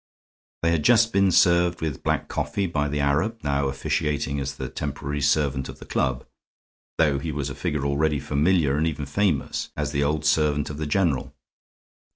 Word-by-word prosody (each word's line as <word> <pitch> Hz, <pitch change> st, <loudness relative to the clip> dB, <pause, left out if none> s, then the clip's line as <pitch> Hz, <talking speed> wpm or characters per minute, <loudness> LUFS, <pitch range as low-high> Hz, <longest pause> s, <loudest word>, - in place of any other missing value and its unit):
They 85 Hz, -, +3 dB
had 85 Hz, -2 st, +1 dB
just 115 Hz, +2 st, +4 dB
been 100 Hz, 0 st, +4 dB
served 85 Hz, 0 st, +4 dB
with 75 Hz, -4 st, -3 dB
black -, -, -1 dB
coffee 100 Hz, -, -2 dB
by 75 Hz, -5 st, -1 dB
the 75 Hz, +1 st, -2 dB
Arab 75 Hz, +11 st, +1 dB
now 70 Hz, -1 st, 0 dB
officiating 70 Hz, +1 st, -1 dB
as 70 Hz, 0 st, -4 dB
the -, -, -5 dB
temporary 70 Hz, 0 st, -4 dB
servant 70 Hz, -2 st, +1 dB
of -, -, -9 dB
the -, -, -12 dB
club, 65 Hz, -3 st, -1 dB, 0.7 s
though 75 Hz, -4 st, +3 dB
he 80 Hz, +3 st, -4 dB
was 70 Hz, -1 st, -3 dB
a -, -, -4 dB
figure 70 Hz, +1 st, -2 dB
already 75 Hz, +1 st, +1 dB
familiar, 75 Hz, +1 st, +2 dB
and 80 Hz, +2 st, +1 dB
even 75 Hz, -3 st, -3 dB
famous, 80 Hz, 0 st, -1 dB
as -, -, -2 dB
the 70 Hz, -, 0 dB
old 75 Hz, +1 st, -1 dB
servant 75 Hz, -2 st, +2 dB
of 75 Hz, -, -7 dB
the 75 Hz, -, -2 dB
general. 80 Hz, -4 st, 0 dB
75 Hz, 185 wpm, -24 LUFS, 70-80 Hz, 0.7 s, just